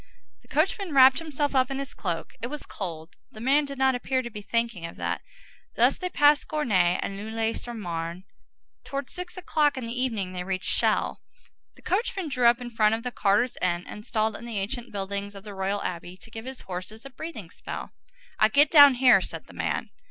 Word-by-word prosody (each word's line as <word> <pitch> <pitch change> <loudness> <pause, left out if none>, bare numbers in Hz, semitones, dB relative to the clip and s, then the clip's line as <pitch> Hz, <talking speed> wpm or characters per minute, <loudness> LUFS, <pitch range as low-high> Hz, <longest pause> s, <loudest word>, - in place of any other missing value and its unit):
The - - -24
coachman 355 +1 0
wrapped 265 +1 +8
himself 295 -3 -2
up 255 -1 +3
in 270 - -3
his 275 0 -5
cloak. 170 -5 -4
It 235 - -2
was 295 +3 -6
cold. 165 -4 -7
The 215 - -11
man 275 +5 +3
did 280 -1 -7
not 265 0 +4
appear 255 +1 -1
to 240 - -6
be 210 -1 -7
thinking 230 -4 -1
of 165 - -6
that. - - -2 0.5
Thus - - +4
they 365 - -2
passed 290 -3 +4
Gournay 195 - +2
and 195 - -4
Neuilly 220 +2 -2
sur 240 0 -6
Marne. 170 -3 -4 0.6
Towards 275 -1 -5
six 360 0 -7
o'clock 300 -6 +1
in 255 - -4
the 230 - -4
evening 225 -7 -1
they 180 -1 -4
reached 185 0 -1
Chelles. - - +1 0.6
The - - -20
coachman 385 -4 -1
drew 250 -3 +3
up 240 +1 +5
in 245 -1 -7
front 220 -1 +3
of 230 - -6
the 250 - -3
carters' 210 +3 +1
inn 175 -1 0
installed 215 +1 -2
in - - -8
the 230 -3 -4
ancient 225 +5 -4
buildings 200 0 -4
of 195 - -10
the 210 -1 -8
Royal 195 +1 -2
Abbey, 175 +1 -5
to 225 - -16
give 225 +1 -7
his 260 0 -7
horses 190 +6 -7
a 275 - -9
breathing 250 - -8
spell. - - -7 0.5
"I 215 - +6
get 285 +6 +4
down 285 -4 +9
here," 250 0 +6
said - - -6
the - - -15
man. - - -2
235 Hz, 210 wpm, -26 LUFS, 195-275 Hz, 0.6 s, down